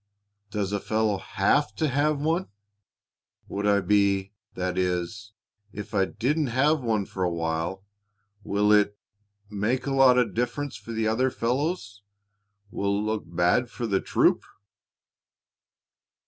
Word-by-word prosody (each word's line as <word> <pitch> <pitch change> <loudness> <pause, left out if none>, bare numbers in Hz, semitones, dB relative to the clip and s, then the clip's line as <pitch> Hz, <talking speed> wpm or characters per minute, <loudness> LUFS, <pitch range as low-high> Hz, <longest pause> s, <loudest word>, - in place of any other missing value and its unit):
"Does 105 -2 -2
a 100 - 0
fellow 110 -1 0
have 145 +13 +1
to 155 - 0
have 145 +2 +1
one? 165 +5 0 1.0
Would 100 +1 -2
I 100 0 +4
be 100 0 +2 0.2
that 90 0 -2
is, 95 +3 -2 0.4
if 105 +2 -8
I 100 -2 +3
didn't 140 +10 -1
have 140 +5 +2
one 110 -4 0
for 95 - -7
a 90 - +2
while, 85 +3 -2 0.6
will 105 +1 +1
it 105 -1 +4 0.5
make 105 +5 -1
a 140 - -1
lot 135 -2 +6
of 125 -2 +2
difference 125 +4 -2
for 105 +2 -9
the 110 -1 -1
other 125 +4 +2
fellows 125 - -2 0.7
will 100 0 0
it 105 - -1
look 110 0 -2
bad 90 +8 +1
for 120 - -5
the 100 -4 +1
troop?" - - +2
105 Hz, 140 wpm, -26 LUFS, 100-125 Hz, 1.0 s, lot